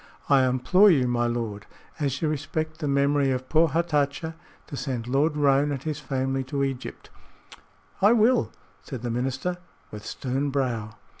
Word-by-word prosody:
I 135 Hz, -2 st, +5 dB
implore 130 Hz, +11 st, +4 dB
you, 135 Hz, -8 st, +3 dB
my 120 Hz, -1 st, +1 dB
lord, 115 Hz, -4 st, -4 dB, 0.3 s
as 140 Hz, 0 st, -1 dB
you -, -, +2 dB
respect 155 Hz, +2 st, -3 dB
the 150 Hz, -, -2 dB
memory 140 Hz, 0 st, +2 dB
of 130 Hz, 0 st, -2 dB
poor 165 Hz, +1 st, +4 dB
Hatatcha, 160 Hz, 0 st, 0 dB, 0.3 s
to -, -, -8 dB
send 130 Hz, -5 st, -3 dB
Lord 145 Hz, +5 st, +1 dB
Roane 145 Hz, 0 st, +3 dB
and 135 Hz, -2 st, -4 dB
his 155 Hz, -2 st, -3 dB
family 135 Hz, 0 st, -2 dB
to 140 Hz, +1 st, -2 dB
Egypt." 135 Hz, -2 st, -5 dB, 0.9 s
"I 205 Hz, +3 st, +6 dB
will," 235 Hz, +1 st, +3 dB, 0.3 s
said 130 Hz, -5 st, -8 dB
the 120 Hz, -, -2 dB
minister, 135 Hz, +9 st, -2 dB, 0.3 s
with 105 Hz, 0 st, -8 dB
stern 135 Hz, +2 st, -2 dB
brow. 120 Hz, -6 st, -2 dB
140 Hz, 160 wpm, -25 LUFS, 130-155 Hz, 0.9 s, I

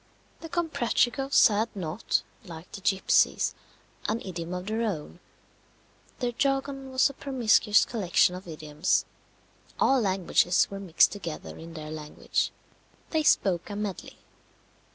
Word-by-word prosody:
The 330 Hz, -, -9 dB
Comprachicos 275 Hz, -4 st, +2 dB
had 215 Hz, +2 st, 0 dB
not, 175 Hz, +2 st, -1 dB, 0.2 s
like 170 Hz, -3 st, -11 dB
the 195 Hz, -, -8 dB
gipsies, 195 Hz, 0 st, +2 dB, 0.6 s
an 220 Hz, +2 st, 0 dB
idiom 170 Hz, -2 st, -5 dB
of 180 Hz, 0 st, -5 dB
their 220 Hz, +2 st, -2 dB
own; 180 Hz, -7 st, -3 dB, 1.0 s
their 245 Hz, -1 st, -1 dB
jargon 270 Hz, +1 st, -1 dB
was 260 Hz, 0 st, +3 dB
a -, -, -16 dB
promiscuous 230 Hz, -6 st, +3 dB
collection 185 Hz, -5 st, +2 dB
of 185 Hz, 0 st, -9 dB
idioms: 155 Hz, +1 st, -1 dB, 0.7 s
all 265 Hz, -1 st, +4 dB
languages 185 Hz, -2 st, +2 dB
were 195 Hz, -, -5 dB
mixed 180 Hz, -4 st, +4 dB
together 170 Hz, -6 st, -7 dB
in 165 Hz, 0 st, -11 dB
their 155 Hz, -1 st, -7 dB
language; 150 Hz, -1 st, -2 dB, 0.6 s
they 315 Hz, -, +2 dB
spoke 190 Hz, -, +2 dB
a 205 Hz, -, -5 dB
medley. 205 Hz, -3 st, -5 dB
200 Hz, 130 wpm, -27 LUFS, 175-245 Hz, 1.0 s, all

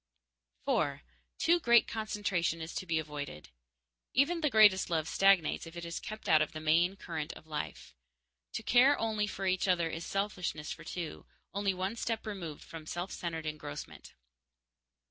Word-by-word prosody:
_4. -, -, +1 dB, 0.4 s
Too 345 Hz, +1 st, +4 dB
great 235 Hz, -6 st, +5 dB
concentration 205 Hz, -6 st, -1 dB
is 160 Hz, +1 st, -6 dB
to 185 Hz, -, -4 dB
be 165 Hz, -1 st, +1 dB
avoided. 145 Hz, -, -5 dB, 0.7 s
Even 320 Hz, +6 st, +3 dB
the 300 Hz, -, +3 dB
greatest 210 Hz, -6 st, +6 dB
love 160 Hz, -2 st, 0 dB
stagnates 195 Hz, -4 st, +3 dB
if 165 Hz, +1 st, -10 dB
it 170 Hz, -, -5 dB
is 170 Hz, 0 st, -4 dB
kept 215 Hz, 0 st, -7 dB
out 155 Hz, -1 st, +6 dB
of 155 Hz, -, -1 dB
the 155 Hz, -, -5 dB
main 165 Hz, +4 st, +3 dB
current 160 Hz, -5 st, -5 dB
of -, -, -13 dB
life. 150 Hz, -, -5 dB, 0.6 s
To -, -, -3 dB
care 260 Hz, +4 st, +5 dB
only 215 Hz, -2 st, 0 dB
for 195 Hz, -1 st, -4 dB
each 185 Hz, +1 st, +1 dB
other 170 Hz, -3 st, +2 dB
is 165 Hz, -, -5 dB
selfishness 180 Hz, -7 st, -2 dB
for -, -, -7 dB
two, 170 Hz, -3 st, -6 dB, 0.3 s
only 200 Hz, -1 st, 0 dB
one 190 Hz, +4 st, -2 dB
step 225 Hz, -1 st, -2 dB
removed 180 Hz, -8 st, -6 dB
from 160 Hz, -1 st, -10 dB
self 175 Hz, +3 st, -4 dB
centered 165 Hz, -2 st, -4 dB
engrossment. 150 Hz, -1 st, -7 dB
180 Hz, 165 wpm, -32 LUFS, 160-210 Hz, 0.7 s, greatest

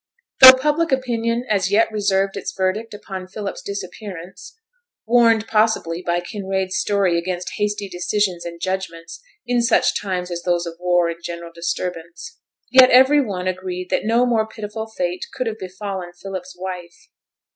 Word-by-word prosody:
Though 260 Hz, 0 st, +12 dB
public 300 Hz, +4 st, 0 dB
opinion 240 Hz, -2 st, -1 dB
as 190 Hz, -3 st, +1 dB
yet 220 Hz, +3 st, +3 dB
reserved 195 Hz, -2 st, 0 dB
its -, -, -4 dB
verdict 195 Hz, +4 st, -2 dB
upon 190 Hz, -2 st, -8 dB
Philip's 200 Hz, +1 st, -6 dB
disappearance 190 Hz, -, -8 dB, 0.5 s
warned 230 Hz, -2 st, +4 dB
possibly 215 Hz, -7 st, +1 dB
by 175 Hz, -1 st, -1 dB
Kinraid's 190 Hz, -1 st, -3 dB
story 190 Hz, -3 st, +1 dB
against 180 Hz, +1 st, -4 dB
hasty 210 Hz, -1 st, -1 dB
decisions 185 Hz, 0 st, -1 dB
and 170 Hz, 0 st, -8 dB
judgments 170 Hz, -3 st, -5 dB, 0.2 s
in 245 Hz, -1 st, +1 dB
such 235 Hz, -1 st, +2 dB
times 185 Hz, -3 st, -3 dB
as 175 Hz, 0 st, -4 dB
those 175 Hz, -1 st, 0 dB
of 165 Hz, 0 st, -8 dB
war 175 Hz, -1 st, +2 dB
and 170 Hz, 0 st, -6 dB
general 170 Hz, 0 st, -7 dB
disturbance 170 Hz, -, -5 dB, 0.3 s
yet 260 Hz, -1 st, +8 dB
every 265 Hz, +4 st, +6 dB
one 190 Hz, -6 st, -4 dB
agreed 185 Hz, -1 st, -4 dB
that -, -, +1 dB
no 230 Hz, +3 st, +2 dB
more 225 Hz, -3 st, +1 dB
pitiful 220 Hz, 0 st, -6 dB
fate 180 Hz, -4 st, -3 dB
could 255 Hz, -, -2 dB
have 220 Hz, -1 st, -4 dB
befallen 190 Hz, -1 st, -6 dB
Philip's 185 Hz, 0 st, -8 dB
wife. 180 Hz, -2 st, -8 dB
190 Hz, 155 wpm, -21 LUFS, 180-220 Hz, 0.5 s, Though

